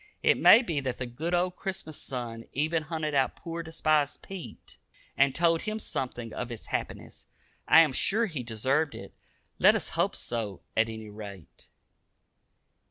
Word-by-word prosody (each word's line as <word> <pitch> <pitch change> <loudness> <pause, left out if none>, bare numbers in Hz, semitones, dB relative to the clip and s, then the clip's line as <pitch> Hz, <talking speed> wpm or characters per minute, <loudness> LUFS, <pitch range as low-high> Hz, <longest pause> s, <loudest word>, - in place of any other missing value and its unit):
It - - +4
may 235 - +8
be 165 -10 -1
that 130 -3 -3
the 125 - -3
good 155 +9 -2
old 180 +1 0
Christmas 185 -6 -5
sun 115 -3 -5
even 160 +4 +1
hunted 155 -1 -3
out 135 -2 +2
poor 170 0 -6
despised 155 -3 0
Pete, 190 -3 -9 0.4
and 140 -1 +3
told 165 -1 +3
him 215 0 -3
something 125 - -4
of 125 - -4
its 115 - -7
happiness. - - -4 0.4
I 165 - +9
am 155 -5 +3
sure 220 - +2
he 160 - -4
deserved 130 +7 0
it. - - -10 0.5
Let - - +7
us - - -2
hope - - 0
so 105 -7 -3
at 110 0 +3
any 110 -1 -8
rate. 100 -5 -10
145 Hz, 165 wpm, -28 LUFS, 120-165 Hz, 0.5 s, I